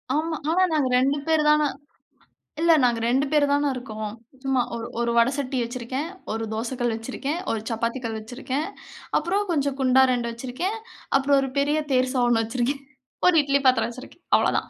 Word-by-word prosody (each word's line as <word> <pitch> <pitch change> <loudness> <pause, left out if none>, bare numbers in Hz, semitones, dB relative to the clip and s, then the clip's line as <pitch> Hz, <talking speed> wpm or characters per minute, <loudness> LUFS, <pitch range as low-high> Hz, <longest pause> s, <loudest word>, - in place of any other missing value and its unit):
ஆமா. 320 +1 0
ஆனா, 360 +3 +3
நாங்க 285 -5 +2
2 275 +3 +2
பேரு 320 -1 +3
தான 300 0 +4 1.0
இல்ல 335 0 +5
நாங்க 240 -2 +3
2 265 +3 +2
பேரு 300 -2 +4
தான 285 0 +2
இருக்கோம். 215 -4 -5 0.3
சும்மா 265 -2 +2
ஒரு 230 0 -5
ஒரு 235 0 +1
வட 235 +2 +5
சட்டி 270 -1 -2
வச்சிருக்கேன். 255 +5 -4 0.2
1 225 +1 -2
தோசைக்கல் 240 +1 -2
வச்சிருக்கேன், 265 +7 -4
1 225 - -1
சப்பாத்தி 230 +2 -2
கல் 225 -1 -3
வச்சிருக்கேன். 260 +6 -4 0.5
அப்பறம் 390 +5 -1
கொஞ்சம் 280 -4 0
குண்டா 265 0 +5
2 240 -1 -1
வச்சிருக்கேன். 260 - -3 0.4
அப்பறம் 275 +1 +3
1 270 - -2
பெரிய 290 +2 +2
தேர்சா 255 0 +2 0.2
வச்சிருக்கேன். 245 +5 -1 0.5
1 360 - +5
இட்லி 280 0 +2
பாத்திரம் 255 -2 +3
வச்சிருக்கேன். 260 +8 -12
அவ்ளதான். - - 0
265 Hz, 165 wpm, -24 LUFS, 240-290 Hz, 1.0 s, இல்ல